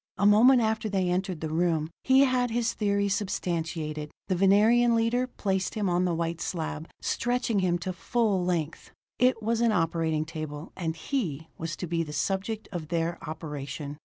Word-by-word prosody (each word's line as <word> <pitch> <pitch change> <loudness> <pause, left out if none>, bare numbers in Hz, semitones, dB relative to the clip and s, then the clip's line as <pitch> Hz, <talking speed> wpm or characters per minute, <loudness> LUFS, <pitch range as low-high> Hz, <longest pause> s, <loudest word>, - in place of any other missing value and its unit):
A 200 - +1
moment 235 +5 +7
after 220 0 0
they 190 -3 0
entered 185 -2 -2
the 160 - -3
room, 165 -2 +1
he 265 +1 +5
had 255 -2 +3
his 235 +1 0
theory 200 -1 +1
substantiated: 165 -6 -2 0.2
the 185 - +2
Venerian 220 +6 +5
leader 235 +3 +1
placed 190 -6 -2
him 210 -2 0
on 175 +1 +2
the 175 -2 0
white 165 0 -2
slab, 160 -2 -4
stretching 245 -3 0
him 180 -2 +2
to 185 +2 -4
full 200 0 0
length. 170 -3 -2 0.3
It 250 -3 +3
was 230 +1 +1
an 235 -1 +4
operating 165 -4 0
table 155 -1 -6
and 165 -4 -3
he 160 - -3
was 165 -1 -3
to - - -5
be 165 0 -1
the 150 -2 -5
subject 195 +7 -2
of 170 -5 -5
their 170 +1 -1
operation! 150 -1 -6
180 Hz, 175 wpm, -28 LUFS, 165-220 Hz, 0.3 s, moment